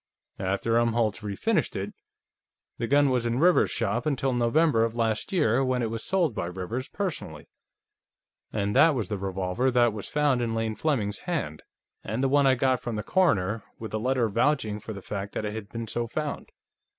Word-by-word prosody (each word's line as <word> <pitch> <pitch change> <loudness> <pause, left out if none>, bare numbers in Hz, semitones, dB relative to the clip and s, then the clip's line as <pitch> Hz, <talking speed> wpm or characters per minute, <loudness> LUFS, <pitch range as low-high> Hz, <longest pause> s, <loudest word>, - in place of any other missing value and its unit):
After 100 +5 +1
Umholtz 115 -2 +1
refinished 100 -2 -1
it, - - -4 0.9
the 115 - -1
gun 140 0 +4
was 125 -2 +1
in 120 +1 0
Rivers's 175 +5 +4
shop 115 +3 -1
until 135 -2 0
November 120 +1 +3
of 115 0 -1
last 110 -2 -1
year, 135 - +2
when 130 -2 0
it 110 - -2
was 115 0 -4
sold 175 -8 +1
by 85 - -3
Rivers 95 +9 -4
personally. 150 - -4 1.0
And 100 0 -1
that 150 +3 +6
was 110 -7 -2
the 105 - -2
revolver 95 +6 -1
that 120 -3 +3
was 105 -2 -6
found 145 -4 +2
in 115 -1 -1
Lane 115 -1 -1
Fleming's 110 -7 -1
hand, 155 - -3 0.4
and 110 +6 -2
the 135 - +3
one 140 0 +4
I 130 - +5
got 130 0 +2
from 120 -2 -4
the 105 - -3
coroner, 115 - +2 0.2
with 110 -1 -7
a 110 - 0
letter 125 0 +1
vouching 110 -1 +1
for 110 - -8
the 100 -3 -8
fact 100 0 -5
that 110 - -3
it 105 - -3
had 110 -2 -6
been 115 0 -5
so 120 +2 -3
found." 150 +4 -4
115 Hz, 195 wpm, -27 LUFS, 105-135 Hz, 1.0 s, that